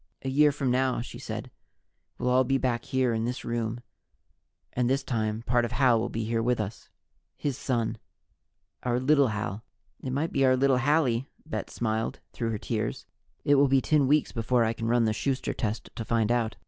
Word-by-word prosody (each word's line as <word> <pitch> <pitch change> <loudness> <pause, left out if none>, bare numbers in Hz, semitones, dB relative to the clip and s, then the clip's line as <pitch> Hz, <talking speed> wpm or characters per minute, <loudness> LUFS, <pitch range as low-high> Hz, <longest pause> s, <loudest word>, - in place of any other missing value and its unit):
"A 135 - -2
year 145 +2 +5
from 140 -3 -1
now," 130 0 +1
she 120 - -8
said, - - -6 0.7
"we'll 125 - -1
all 130 +1 +5
be 135 +2 +1
back 120 -3 -1
here 130 -3 +1
in 110 0 -1
this 125 +2 -3
room 115 0 -2 0.9
and, 125 -1 +1
this 135 +1 +1
time, 110 -3 -2
part 120 0 +2
of 120 - -3
Hal 125 -3 +4
will 110 - -2
be 115 - -3
here 115 +1 0
with 120 +1 +1
us 105 +1 -5 0.5
his 145 -3 -2
son, 120 -4 -1 0.8
our 125 0 0
little 140 +1 +4
Hal." 110 -1 -3 0.4
"It 130 - -4
might 145 +5 -1
be 135 - +1
our 130 -1 +5
little 135 -1 +3
Hallie." 135 -3 +2 0.2
Bet 155 - -4
smiled 110 +2 -2
through 115 -2 -2
her 110 - -1
tears. 110 +1 -3 0.4
"It 145 - +5
will 140 - +5
be 135 0 +4
ten 135 +4 +2
weeks 150 +2 +3
before 120 +1 +1
I 110 - 0
can 115 0 -4
run 120 0 +3
the 110 - +1
Schuster 130 +4 -1
test 110 -2 -3
to 115 - -4
find 115 0 +1
out." 115 -2 0
120 Hz, 200 wpm, -28 LUFS, 115-135 Hz, 0.9 s, year